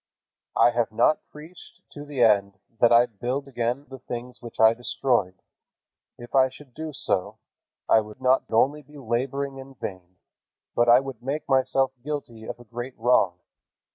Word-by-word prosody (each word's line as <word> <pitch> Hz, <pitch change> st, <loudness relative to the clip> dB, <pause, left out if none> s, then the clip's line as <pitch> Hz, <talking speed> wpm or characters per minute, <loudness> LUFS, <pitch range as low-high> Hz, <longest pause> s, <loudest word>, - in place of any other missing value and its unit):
"I 120 Hz, -, +5 dB
have 120 Hz, -1 st, 0 dB
not 120 Hz, +7 st, +3 dB
preached 160 Hz, +4 st, -13 dB
to 145 Hz, -, -9 dB
the 140 Hz, -4 st, 0 dB
end 100 Hz, -3 st, +3 dB, 0.2 s
that 120 Hz, -, +5 dB
I 120 Hz, +1 st, +7 dB
build 125 Hz, +5 st, -4 dB
again 125 Hz, +1 st, -2 dB
the 135 Hz, -1 st, -10 dB
things 125 Hz, 0 st, -7 dB
which 120 Hz, -1 st, -11 dB
I 110 Hz, 0 st, +7 dB
destroyed. 120 Hz, -5 st, -1 dB, 0.7 s
If 120 Hz, 0 st, -12 dB
I 130 Hz, -1 st, +5 dB
should 130 Hz, -1 st, -15 dB
do 160 Hz, +3 st, -6 dB
so, 95 Hz, -9 st, -1 dB, 0.5 s
I 110 Hz, -, +6 dB
would 105 Hz, -1 st, -8 dB
not 130 Hz, 0 st, +3 dB
only 140 Hz, +7 st, +2 dB
be 150 Hz, +1 st, -16 dB
laboring 135 Hz, +2 st, -2 dB
in 135 Hz, 0 st, -11 dB
vain, 95 Hz, -5 st, -8 dB, 0.6 s
but 120 Hz, 0 st, +3 dB
I 120 Hz, +2 st, +7 dB
would 135 Hz, -4 st, -8 dB
make 140 Hz, +5 st, -4 dB
myself 135 Hz, 0 st, +2 dB
guilty 130 Hz, -7 st, -5 dB
of 120 Hz, -, -7 dB
a -, -, -12 dB
great 120 Hz, +3 st, -7 dB
wrong. 105 Hz, -7 st, +2 dB
125 Hz, 170 wpm, -25 LUFS, 115-135 Hz, 0.7 s, I